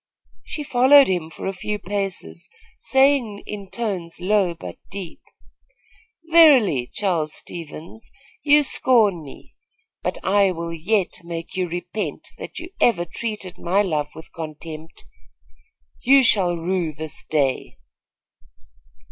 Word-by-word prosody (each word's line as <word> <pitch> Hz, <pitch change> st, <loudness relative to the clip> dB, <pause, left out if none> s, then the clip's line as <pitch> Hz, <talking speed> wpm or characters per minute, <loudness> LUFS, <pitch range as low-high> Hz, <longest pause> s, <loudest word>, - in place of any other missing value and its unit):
She 300 Hz, -, -5 dB
followed 275 Hz, +1 st, +6 dB
him 175 Hz, -4 st, -1 dB
for -, -, -9 dB
a 195 Hz, -, -1 dB
few 210 Hz, +3 st, -3 dB
paces, 195 Hz, -3 st, -4 dB, 0.3 s
saying 265 Hz, -6 st, +2 dB
in 200 Hz, -2 st, -7 dB
tones 190 Hz, -7 st, -4 dB
low 190 Hz, -2 st, +2 dB
but 165 Hz, -, -9 dB
deep: 190 Hz, -4 st, -7 dB, 1.1 s
"Verily, 255 Hz, -, +6 dB
Charles 170 Hz, -7 st, -1 dB
Stevens, 170 Hz, +5 st, -9 dB, 0.3 s
you 295 Hz, 0 st, +5 dB
scorn 225 Hz, -, +3 dB
me; 140 Hz, -, -13 dB, 0.5 s
but -, -, -2 dB
I 195 Hz, -1 st, +3 dB
will 170 Hz, 0 st, -5 dB
yet 180 Hz, +3 st, 0 dB
make 165 Hz, -1 st, -7 dB
you 185 Hz, -2 st, -1 dB
repent 175 Hz, +5 st, -5 dB
that -, -, -8 dB
you 340 Hz, +2 st, -7 dB
ever 185 Hz, -8 st, +3 dB
treated 195 Hz, -1 st, -5 dB
my 195 Hz, +4 st, +2 dB
love 150 Hz, -6 st, -1 dB
with 160 Hz, +1 st, -12 dB
contempt. 160 Hz, 0 st, -8 dB, 1.0 s
You 270 Hz, +2 st, +6 dB
shall 185 Hz, -7 st, +3 dB
rue 170 Hz, -1 st, -1 dB
this 155 Hz, 0 st, -7 dB
day." 140 Hz, -, -1 dB
185 Hz, 120 wpm, -22 LUFS, 165-220 Hz, 1.1 s, followed